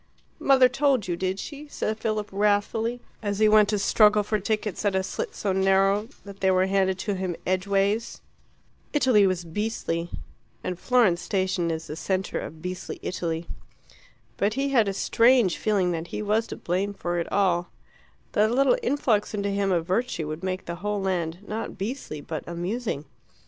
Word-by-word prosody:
"Mother 265 Hz, -2 st, +6 dB
told 260 Hz, -4 st, +1 dB
you, 175 Hz, -, -1 dB
did 185 Hz, +2 st, -2 dB
she?" 295 Hz, +4 st, -7 dB
said 220 Hz, -6 st, -3 dB
Philip 215 Hz, -2 st, -1 dB
wrathfully, 210 Hz, +4 st, +1 dB, 0.2 s
as 205 Hz, -2 st, -2 dB
he 215 Hz, +1 st, +4 dB
went 210 Hz, -1 st, +5 dB
to 210 Hz, -, +1 dB
struggle 210 Hz, +1 st, +4 dB
for 215 Hz, +1 st, -1 dB
tickets 210 Hz, 0 st, -2 dB
at 200 Hz, -2 st, +1 dB
a 190 Hz, -, +1 dB
slit 190 Hz, -, -4 dB
so 195 Hz, -2 st, -1 dB
narrow 195 Hz, +2 st, +3 dB, 0.2 s
that 200 Hz, -1 st, -10 dB
they 190 Hz, -, +2 dB
were 185 Hz, 0 st, +3 dB
handed 190 Hz, -1 st, +1 dB
to 205 Hz, +1 st, -2 dB
him 185 Hz, -2 st, -2 dB
edgeways. 200 Hz, +4 st, 0 dB, 0.7 s
Italy 255 Hz, -9 st, +4 dB
was 180 Hz, -2 st, -1 dB
beastly, 170 Hz, -2 st, -2 dB, 0.5 s
and 180 Hz, -1 st, -4 dB
Florence 225 Hz, -9 st, +3 dB
station 185 Hz, -2 st, 0 dB
is 160 Hz, 0 st, -3 dB
the 150 Hz, -, -6 dB
centre 190 Hz, +3 st, -2 dB
of 160 Hz, +1 st, -8 dB
beastly 180 Hz, 0 st, -5 dB
Italy. 170 Hz, -2 st, -3 dB, 0.9 s
But 205 Hz, +2 st, +1 dB
he 275 Hz, +1 st, 0 dB
had 235 Hz, -6 st, +3 dB
a 195 Hz, -, 0 dB
strange 230 Hz, -3 st, +4 dB
feeling 195 Hz, -4 st, +1 dB
that 165 Hz, 0 st, -3 dB
he 210 Hz, -, -4 dB
was 215 Hz, +2 st, +1 dB
to -, -, -6 dB
blame 195 Hz, +3 st, -2 dB
for 175 Hz, -2 st, -2 dB
it 170 Hz, -, -4 dB
all; 180 Hz, -3 st, +2 dB, 0.6 s
that 215 Hz, +1 st, +3 dB
a -, -, -1 dB
little 275 Hz, -, +4 dB
influx 235 Hz, -, +1 dB
into 200 Hz, -1 st, -1 dB
him 200 Hz, -1 st, 0 dB
of 170 Hz, -3 st, +1 dB
virtue 185 Hz, -4 st, -1 dB
would 155 Hz, +2 st, -5 dB
make 185 Hz, 0 st, -3 dB
the 170 Hz, 0 st, -5 dB
whole 210 Hz, +2 st, -2 dB
land 180 Hz, -1 st, -2 dB
not 225 Hz, +1 st, -4 dB
beastly 200 Hz, -, -5 dB
but 155 Hz, +1 st, -5 dB
amusing. 175 Hz, -, -3 dB
200 Hz, 180 wpm, -26 LUFS, 180-215 Hz, 0.9 s, Mother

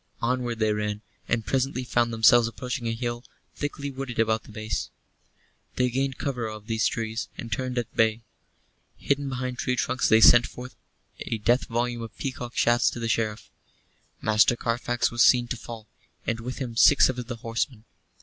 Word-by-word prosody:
Onward 120 Hz, -1 st, -1 dB
they 110 Hz, -1 st, +1 dB
ran; 105 Hz, 0 st, -3 dB, 0.2 s
and 115 Hz, -2 st, 0 dB
presently 130 Hz, -1 st, -1 dB
found 120 Hz, -1 st, +1 dB
themselves 115 Hz, +1 st, +5 dB
approaching 125 Hz, +1 st, -4 dB
a 115 Hz, -, 0 dB
hill, 120 Hz, 0 st, -4 dB, 0.3 s
thickly 145 Hz, -1 st, -4 dB
wooded 130 Hz, -2 st, -6 dB
about 110 Hz, -1 st, +1 dB
the -, -, -13 dB
base. 110 Hz, 0 st, -4 dB, 0.9 s
They 125 Hz, -1 st, +1 dB
gained 135 Hz, +1 st, -1 dB
cover 125 Hz, -5 st, -2 dB
of 110 Hz, -1 st, -8 dB
these 110 Hz, -1 st, +1 dB
trees, 115 Hz, -1 st, -3 dB
and 115 Hz, -, -7 dB
turned 130 Hz, +3 st, -2 dB
at 120 Hz, -3 st, -3 dB
bay. 110 Hz, 0 st, +2 dB, 0.7 s
Hidden 140 Hz, 0 st, -1 dB
behind 125 Hz, -1 st, -4 dB
tree 125 Hz, -, 0 dB
trunks 125 Hz, +1 st, 0 dB
they 110 Hz, -, +6 dB
sent 120 Hz, +2 st, +7 dB
forth 125 Hz, +1 st, -10 dB, 0.4 s
a 115 Hz, -, -3 dB
death 120 Hz, +5 st, +2 dB
volume 120 Hz, 0 st, -1 dB
of 115 Hz, -2 st, -9 dB
peacock 125 Hz, -3 st, -5 dB
shafts 120 Hz, 0 st, +4 dB
to -, -, -7 dB
the 115 Hz, -, -2 dB
Sheriff. 115 Hz, -1 st, -2 dB, 0.7 s
Master 110 Hz, +2 st, +4 dB
Carfax 120 Hz, +1 st, -1 dB
was 120 Hz, 0 st, 0 dB
seen 120 Hz, -1 st, +5 dB
to -, -, -1 dB
fall, 115 Hz, -2 st, -9 dB, 0.4 s
and 115 Hz, -1 st, -1 dB
with 125 Hz, +3 st, -6 dB
him 125 Hz, -4 st, -5 dB
six 140 Hz, +4 st, +6 dB
of 125 Hz, -2 st, -4 dB
the 120 Hz, -, -4 dB
horsemen. 115 Hz, +1 st, -3 dB
120 Hz, 180 wpm, -26 LUFS, 115-125 Hz, 0.9 s, sent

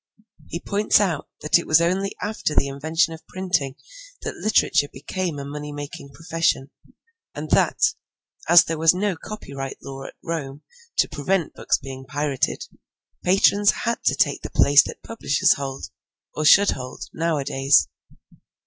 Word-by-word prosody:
He 170 Hz, -, -5 dB
points 205 Hz, +3 st, +2 dB
out 180 Hz, -8 st, -1 dB
that 155 Hz, +3 st, +3 dB
it -, -, -7 dB
was 155 Hz, 0 st, +5 dB
only 185 Hz, +4 st, 0 dB
after 210 Hz, -7 st, -2 dB
the 140 Hz, -, +3 dB
invention 160 Hz, +4 st, 0 dB
of 160 Hz, 0 st, -13 dB
printing 180 Hz, -8 st, -2 dB, 0.5 s
that -, -, -3 dB
literature 215 Hz, -8 st, +2 dB
became 165 Hz, +4 st, -4 dB
a 140 Hz, -, -6 dB
money 150 Hz, +1 st, -6 dB
making 145 Hz, -1 st, -8 dB
profession, 165 Hz, -3 st, -1 dB, 0.6 s
and -, -, -6 dB
that, -, -, +3 dB, 0.7 s
as 175 Hz, 0 st, +9 dB
there 165 Hz, -1 st, -4 dB
was 165 Hz, +2 st, +5 dB
no 200 Hz, 0 st, 0 dB
copyright 140 Hz, -8 st, -7 dB
law 135 Hz, 0 st, -8 dB
at -, -, -10 dB
Rome 150 Hz, -4 st, -5 dB, 0.3 s
to -, -, +3 dB
prevent 170 Hz, +3 st, -1 dB
books -, -, 0 dB
being 130 Hz, 0 st, -9 dB
pirated, 145 Hz, -1 st, -2 dB, 0.6 s
patrons 200 Hz, +2 st, +4 dB
had 235 Hz, 0 st, -1 dB
to -, -, +3 dB
take -, -, +1 dB
the -, -, -6 dB
place 145 Hz, 0 st, +6 dB
that -, -, -9 dB
publishers 225 Hz, -10 st, +2 dB
hold, 135 Hz, -1 st, -6 dB, 0.4 s
or 155 Hz, -, -2 dB
should 200 Hz, +6 st, +7 dB
hold, 130 Hz, -1 st, -7 dB
nowadays. 140 Hz, -, +2 dB
155 Hz, 150 wpm, -23 LUFS, 140-180 Hz, 0.7 s, as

